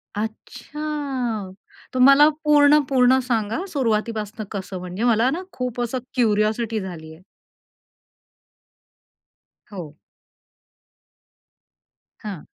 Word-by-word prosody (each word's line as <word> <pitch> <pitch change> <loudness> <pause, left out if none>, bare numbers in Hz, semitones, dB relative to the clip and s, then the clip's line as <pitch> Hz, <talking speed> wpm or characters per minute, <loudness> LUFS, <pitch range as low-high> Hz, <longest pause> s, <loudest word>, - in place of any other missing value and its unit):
अच्छा 245 0 -4 0.4
तर 255 - -2
मला 275 +3 +7 0.2
पूर्ण 295 0 +6
पूर्ण 260 -1 +4
सांगा 225 - -1
सुरुवातीपासून 220 -4 -2
कसं 190 -2 -5
म्हणजे 180 +5 -5
मला 235 +1 +3
ना 340 - -3
खूप 250 -1 -3
असं 240 +2 -2 0.2
क्युरिओसिटी 220 -1 +1
झालीये. 160 -3 -9 2.5
हो. 165 -7 -8 2.2
हां. 200 -7 -8
230 Hz, 80 wpm, -22 LUFS, 210-260 Hz, 2.5 s, मला